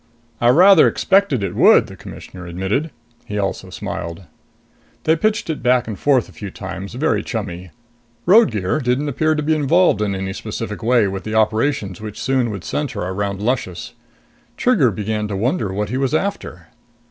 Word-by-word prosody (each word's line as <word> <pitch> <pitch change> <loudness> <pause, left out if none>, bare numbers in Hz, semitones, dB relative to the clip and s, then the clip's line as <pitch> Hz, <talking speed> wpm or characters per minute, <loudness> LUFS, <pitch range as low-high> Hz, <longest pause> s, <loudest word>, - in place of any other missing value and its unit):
"I 120 - +3
rather 180 +6 +7
expected 190 - +2
it 95 - -2
would," - - +6
the - - -11
Commissioner 90 -2 -10
admitted. 95 - -2 0.4
He 105 - -5
also 100 -1 -3
smiled. 85 +2 -6 0.8
They 160 - +3
pitched 215 +6 0
it 160 -2 -3
back 125 -2 +2
and 110 - -4
forth 135 -4 +2
a - - -15
few 100 - -7
times, 95 +2 -7
very 150 +5 +1
chummy. 95 -6 -5 0.6
Roadgear 155 - +4
didn't 130 +2 0
appear 155 +3 +1
to 150 - -2
be 155 +2 +2
involved 155 - +3
in 100 -2 0
any 95 0 -4
specific 110 +1 -5
way 115 -2 +3
with 95 0 -5
the 110 0 -4
operations 110 -2 0
which 105 -1 -7
soon 130 -3 0
would 100 -4 -6
center 140 -11 -3
about 100 +1 -2
Luscious. 105 -5 -3 0.6
Trigger 205 - +3
began 105 +1 -3
to 105 - -4
wonder 115 - -1
what 105 +1 -2
he 125 - -2
was 135 +2 0
after. 155 - -3
110 Hz, 170 wpm, -19 LUFS, 100-145 Hz, 0.8 s, rather